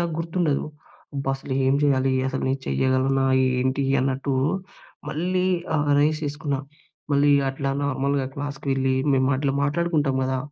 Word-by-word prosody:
నాకు 170 -1 -1
గుర్తుండదు. 165 -3 0 0.5
అబ్బ! 140 -1 -3
అసలు 135 - -7
ఏం 135 +1 +3
చేయాలి? 135 -2 +2 0.2
అసలు 130 0 -3
నే - - +2
చెయ్యగలనా, 130 +1 +1 0.4
ఏంటి 130 +2 0 0.2
అన్నట్టు, 135 +1 -1 0.8
మళ్ళీ 180 +4 -1 0.3
ఆహ్, 150 -1 +1
రైజ్ 150 +1 +2
చేసుకున్నా. 145 -1 -2 0.5
మళ్ళీ 145 +1 +4 0.2
అట్లా 135 +1 -2
నార్మల్‌గా 140 0 0
క్లాస్‌కి 140 0 -6
వెళ్ళి, 135 0 +1 0.2
మేము 130 0 +2
అట్ల 140 0 0
మాట్లాడుకుంటాం 150 -2 +1
గదా! 130 0 0
140 Hz, 135 wpm, -24 LUFS, 135-150 Hz, 0.8 s, మళ్ళీ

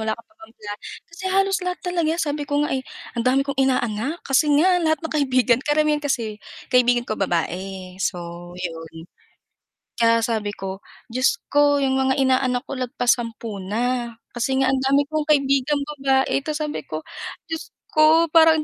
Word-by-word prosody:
wala 220 0 -1
ka 230 - -14
pa - - -32
bang 330 -9 -15
pla" 205 -1 -7 0.4
Kasi 345 - -11
halos 390 0 +2
lahat 360 0 -1
talaga, 340 -3 0
sabi 290 -1 -2
ko 290 0 +1
nga - - -3
eh, 265 - 0 0.4
"Ang 230 - 0
dami 270 +2 +3
kong 280 -1 -4
inaanak." 255 +3 0
Kasi 275 +3 +3
nga 360 +3 +4
lahat 315 -1 +2
ng 320 - -3
kaibigan 255 -3 +3
karamihan 300 +1 +2
kasi 235 -7 -2 0.3
kaibigan 245 -1 +4
ko, 215 - -4
babae, 185 +1 -2
so 175 -1 -4
yun. 165 -3 -6 1.1
Kaya 230 0 +4
sabi 215 -3 -1
ko 190 0 -6 0.3
Diyos 255 +2 +2
ko 290 0 +4
yung 265 -1 +1
mga 265 0 +2
inaanak 255 -1 +2
ko - - -8
lagpas 245 -1 +1
10 230 -2 -6
na, 235 +4 -1 0.2
kasi 265 +3 0
nga 260 - +3
ang 270 - +1
dami 275 +2 +3
kong 310 -1 0
kaibigang 275 -1 +2 0.2
babae 270 0 +2
tas 305 +2 -4
sabi 300 0 -5
ko 155 0 -5 0.5
Diyos 325 - -4 0.2
ko 315 +1 +5
parang 320 -1 +6
265 Hz, 175 wpm, -22 LUFS, 225-300 Hz, 1.1 s, parang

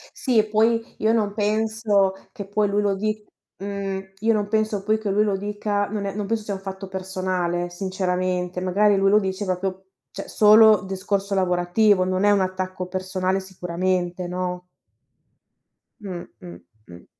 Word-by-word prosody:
Sì, 230 -5 +2
poi 225 +2 +1
io 220 +2 +2
non 210 -3 +1
penso 215 -2 +1 0.2
che 205 -5 -7
poi 205 +1 0
lui 205 +1 +1
lo 200 -1 +1
di 215 +1 -2 0.4
mhmm, 195 -1 -5
io 225 +2 +2
non 205 -1 -1
penso 215 -2 0
poi 215 +1 +2
che 210 -2 -3
lui 210 +2 +3
lo 200 -2 0
dica 205 0 -2
non 205 -1 -4
è 195 - -3
non 210 0 -3
penso 225 -1 -1
sia 205 - -4
un 190 - -5
fatto 195 0 -7
personale 185 -2 -2
sinceramente, 180 -1 -2
magari 200 +3 +3
lui 195 0 +3
lo 210 - +5
dice 195 0 -3
proprio, 185 +1 -3 0.3
cioè, 195 - -7
solo 215 0 +6
discorso 195 +1 -2
lavorativo, 185 +2 +3
non 185 +2 0
è 205 - +5
un 200 -1 +3
attacco 185 0 -3
personale 185 0 -1
sicuramente, 180 -1 -2
no? 180 0 -4 1.4
Mh, 185 -4 -6 0.2
mh, 85 -1 -10 0.3
mh. 85 0 -13
195 Hz, 165 wpm, -23 LUFS, 185-210 Hz, 1.4 s, solo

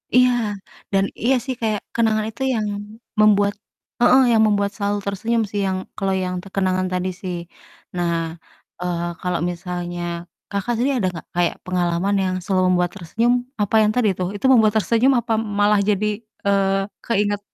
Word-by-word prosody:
Iya, 250 0 +6 0.6
dan 195 0 +4 0.2
iya 260 +3 +4
sih 260 -2 -2
kayak 215 -2 0
kenangan 220 -2 +2
itu 225 - -12
yang 220 -3 0 0.5
membuat, 205 -1 +5 0.5
heeh, 255 +2 +6
yang 220 - +5
membuat 200 -1 +1
selalu 205 -1 -1
tersenyum 225 +4 0
sih, 205 - -2
yang 190 0 0 0.2
kalo 195 -1 0
yang 180 0 -3
te - - -11
kenangan 185 -1 +1
tadi 185 0 -1
sih. 185 -2 -3 0.6
Nah, 175 -1 0 0.7
eee 175 -1 -1 0.2
kalo 180 -1 -1 0.2
misalnya, 175 0 -5 0.5
Kakak 200 +4 -1
sendiri 255 +3 +1
ada 190 - +1
gak - - -10
kayak 175 -1 +1
pengalaman 180 +2 0
yang 185 -1 0
selalu 185 0 +1
membuat 175 0 +1
tersenyum, 225 +7 +1 0.3
apa 205 +1 +1
yang 210 0 +3
tadi 245 -4 +3
tuh? 180 - 0
Itu 205 - -4
membuat 220 -4 +5
tersenyum 230 +5 +3
apa 230 -1 -2 0.3
malah 205 0 +4
jadi 210 0 +1 0.4
eee, 195 0 +1
keinget 205 -2 +1
200 Hz, 165 wpm, -21 LUFS, 185-220 Hz, 0.7 s, Iya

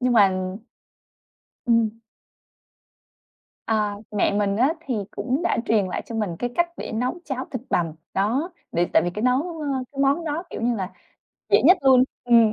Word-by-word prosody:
Nhưng 250 -1 +2
mà 205 -4 +6 1.4
Ừm. 230 -1 +2 1.7
À, 210 -2 +1 0.2
mẹ 210 -1 +1
mình 200 0 +1
á, 255 +5 +4 0.2
thì 255 - -1 0.2
cũng 265 +5 -2
đã 345 - +1
truyền 215 -4 +2
lại 180 - -3
cho 230 - -7
mình 210 -7 -2
cái 245 - -2
cách 345 0 +2
để - - -6
nấu 250 +10 -2
cháo 265 -2 -3
thịt 255 - -4
bằm, 165 -2 +1 0.2
đó, 240 - 0 0.2
để 175 +1 +2
tại - - +5
vì 175 - -1
cái 210 +4 -5
nấu, 280 +7 +1
ơ, 300 - -3 0.3
cái 275 - -4
món 280 +5 +2
đó, 310 +2 -2
kiểu - - -6
như 240 0 +2
là, 190 -2 -4 0.6
dễ - - +6
nhất 370 - +7
luôn, 260 -2 +6 0.2
ừm. 230 -3 +5
235 Hz, 180 wpm, -24 LUFS, 210-270 Hz, 1.7 s, nhất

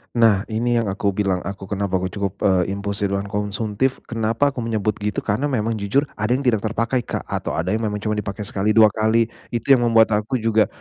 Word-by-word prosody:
Nah, 110 -4 +4
ini 120 +2 0
yang 110 -4 +1
aku 100 0 -1
bilang 95 -3 +1
aku 100 +1 -7
kenapa 100 -1 -1
aku 95 0 -1
cukup, 100 -2 -3
eee, 95 0 +2
impulsif 100 0 -2
dan 100 0 -1
konsumtif, 105 +4 -1
kenapa 115 +5 0
aku 130 - -7
menyebut 110 -2 0
gitu, 105 -1 -2
karena 115 +8 0
memang 115 -4 -1
jujur 105 +9 +1 0.2
ada 115 +4 +1
yang 140 - -2
tidak 115 -5 +2
terpakai 115 +3 0
Kak, 120 - -4
atau - - -3
ada 85 +4 -1
yang 110 - +1
memang 105 - -2
cuman 105 -1 0
dipakai 100 0 -5
sekali 105 +1 -1
2 110 -2 +7
kali. 110 +2 +1 0.2
Itu 120 +4 0
yang 120 -3 +5
membuat 115 -1 +5
aku 105 +5 0
juga, 110 -2 +2
105 Hz, 215 wpm, -21 LUFS, 100-115 Hz, 0.2 s, 2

